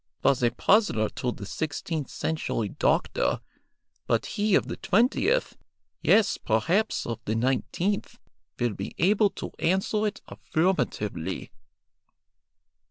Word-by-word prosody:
was 135 - +3
a 120 - +4
puzzler 115 - +2
to 125 - -3
the 105 - -8
sixteenth 155 - -3
century 135 -9 -2
doctor, - - +1 0.7
but - - +1
he 210 -1 +1
of - - +3
the - - -5
twentieth, 240 - +2 0.5
yes, 210 -2 +4
perhaps 165 - +1
of 115 -2 -4
the 110 - -1
nineteenth, 135 - -1 0.4
will 120 -3 +1
be 100 0 -6
able 205 +3 +4
to - - -7
answer 195 +4 +1
it 210 - -4
affirmatively." 105 - -1
160 Hz, 115 wpm, -27 LUFS, -, 0.7 s, a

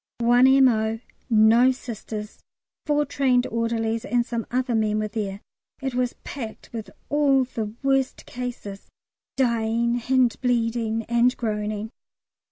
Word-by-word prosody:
One 245 +2 +5
M.O., 230 -5 +4 0.3
no 225 +3 +5
Sisters, 220 -4 -7 0.5
four 295 0 +2
trained 260 -3 +2
orderlies, 230 0 -1
and 240 -1 0
some 235 -2 -4
other 255 0 -1
men 215 -1 +1
were 215 0 -1
there. 205 -2 -4 0.4
It 265 -1 -3
was 250 0 -1
packed 235 -5 -8
with 225 -2 -6 0.2
all 280 -2 +3
the 225 -4 -5
worst 270 -1 0
cases 240 -5 -7 0.5
dying 235 -1 +1
and 255 -3 +3
bleeding 230 -2 0
and 240 +2 +2
groaning. 215 -1 -3
235 Hz, 125 wpm, -24 LUFS, 220-255 Hz, 0.5 s, One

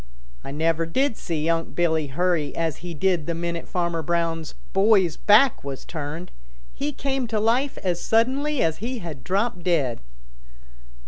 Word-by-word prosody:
I - - -7
never 165 +3 0
did 265 +8 +1
see 160 -5 -3
Unc' 165 0 0
Billy 160 -3 +1
hurry 155 0 0
as 165 -3 -1
he 175 -1 -7
did 175 -2 +1
the 170 - -1
minute 170 0 -3
Farmer 170 -2 -1
Brown's 165 0 -1 0.2
boy's 195 -4 +4
back 220 +5 +5
was 140 -1 -6
turned. 160 +2 -6 0.4
He 290 +2 -2
came 270 -2 -2
to 220 -1 0
life 245 +6 +1
as 175 -2 0
suddenly 265 +5 +2
as 160 -1 +1
he 245 +5 -3
had 160 - -7
dropped 195 0 0
dead." 150 -9 0
170 Hz, 155 wpm, -24 LUFS, 160-220 Hz, 0.4 s, back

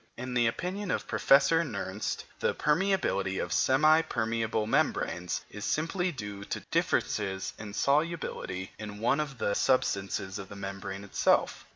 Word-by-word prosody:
In 125 +1 -5
the 120 -1 +3
opinion 185 - -3
of - - -1
Professor 140 +4 +5
Nernst, 105 - -3 0.2
the - - +1
permeability 150 - +1
of - - -2
semi 155 +4 +5
permeable 110 -4 -1
membranes 90 -4 0
is 105 - -7
simply 175 - 0
due 105 -7 -6
to - - -4
differences 95 -2 0
of 105 -2 -7
solubility 140 - -1
in 105 -1 -6
one 120 +6 +2
of 140 -3 -3
the 100 - 0
substances 100 -5 0
of 95 - -8
the 100 - -9
membrane 95 0 -6
itself. 100 - +1
115 Hz, 145 wpm, -29 LUFS, 100-150 Hz, 0.2 s, Professor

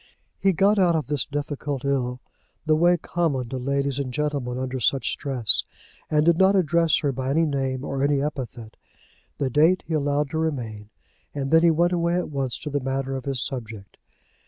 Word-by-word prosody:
He 195 - +3
got 195 +4 +3
out 175 -3 +4
of 155 -3 -2
his 145 -4 -1
difficulty 145 -1 -3
in 125 -2 -1 0.5
the 155 0 +3
way 175 +3 +4
common 150 -8 -2
to 130 - -4
ladies 140 +1 -1
and 135 -2 -3
gentlemen 140 -3 -2
under 130 0 -3
such 135 +2 +1
stress, 130 -6 +1 0.5
and 150 0 +2
did 170 0 +4
not 190 +1 +5
address 170 -3 +3
her 145 - +1
by 130 0 -3
any 160 +4 +2
name 135 -2 -2
or 135 -1 -3
any 145 0 +2
epithet. 125 -6 -5 0.6
The 135 -2 -1
date 160 +7 +3
he 165 - -4
allowed 145 -1 0
to 160 - -1
remain, 115 -10 -3 0.5
and 135 -1 -3
then 165 0 +6
he 170 - +5
went 170 +2 +2
away 170 0 +1
at 180 -3 -2
once 135 -3 -2
to 150 - -5
the 145 - 0
matter 135 0 -2
of 130 - -6
his 135 -3 -1
subject. 110 -7 -7
140 Hz, 195 wpm, -24 LUFS, 130-160 Hz, 0.6 s, then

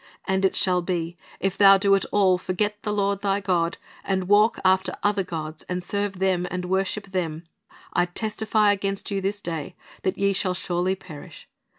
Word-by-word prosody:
And 190 0 0
it 190 - +2
shall 180 -1 +2
be, 170 -1 -3 0.2
if 195 +1 -1
thou 195 -1 +8
do 195 0 +3
at 195 - +3
all 190 -3 +3
forget 205 +3 -2
the 210 - -2
Lord 200 -1 0
thy 200 -1 +1
God, 175 -4 0 0.3
and 190 -2 -1
walk 210 +3 +4
after 190 0 +3
other 205 -1 +2
gods, 160 -3 -6
and 180 0 -2
serve 200 +1 -2
them, 185 -1 +1
and 180 0 -4
worship 190 +2 -1
them, 165 -4 -2 0.5
I 175 - +3
testify 215 +2 +1
against 195 0 -2
you 195 -1 -1
this 200 +2 -2
day 165 -1 -5 0.3
that 190 - -1
ye 200 0 +2
shall 185 -1 0
surely 180 +1 -1
perish. 160 -6 -12
190 Hz, 185 wpm, -24 LUFS, 180-200 Hz, 0.5 s, thou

